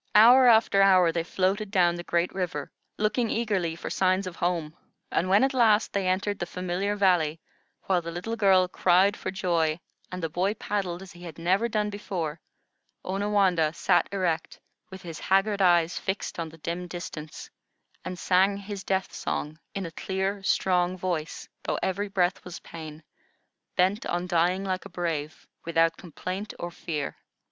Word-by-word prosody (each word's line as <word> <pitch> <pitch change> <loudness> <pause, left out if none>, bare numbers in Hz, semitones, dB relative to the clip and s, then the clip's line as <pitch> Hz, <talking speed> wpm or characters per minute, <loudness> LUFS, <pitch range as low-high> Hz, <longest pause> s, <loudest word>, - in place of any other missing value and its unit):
Hour 245 +4 +8
after 220 -4 +5
hour 185 -3 +6
they 170 - -1
floated 190 +4 -1
down 180 -4 +3
the 175 - -5
great 175 +1 0
river, 175 -7 -3 0.3
looking 215 +2 +1
eagerly 200 -8 0
for 170 - -6
signs 185 +1 +2
of 185 -2 -6
home, 170 -3 -1 0.4
and 185 - 0
when 200 +5 +5
at 270 +1 +2
last 225 -4 +3
they 195 -2 0
entered 195 +2 0
the 175 - -3
familiar 185 +3 -2
valley, 175 -6 +2 0.4
while 185 -2 +1
the 170 - -6
little 180 +7 -4
girl 190 -4 +4
cried 185 +2 +3
for - - -5
joy, 170 -5 0 0.3
and 180 -1 -5
the - - +1
boy 185 +6 -1
paddled 190 -4 -3
as 190 - -12
he 175 - -14
had 170 -4 -9
never 190 +7 +1
done 210 -2 0
before, 170 -6 -4 0.6
Onawandah 190 -5 +1
sat - - +2
erect, 175 -5 -2 0.3
with 190 -1 -10
his 165 -2 -7
haggard 195 +1 +2
eyes 175 -2 +3
fixed 190 -2 -4
on 165 -1 -3
the 160 - -14
dim 170 +3 -4
distance, 165 -3 -8 0.5
and 185 0 -5
sang 190 +3 +3
his 200 0 -7
death 190 -2 -1
song 155 +2 -4 0.2
in 195 -1 -3
a 165 - -6
clear, 190 +3 -2
strong 180 -1 +1
voice, 175 -3 -3
though - - -2
every 200 +2 -1
breath 185 -2 0
was 180 -1 -8
pain, 155 -1 -9 0.7
bent 190 +5 +1
on 175 +1 -1
dying 180 +2 +1
like 185 -1 -2
a - - -8
brave, 160 -4 -4 0.2
without 165 0 +2
complaint 185 +4 -6
or 175 - -5
fear. 155 -4 -4
185 Hz, 170 wpm, -27 LUFS, 170-200 Hz, 0.7 s, Hour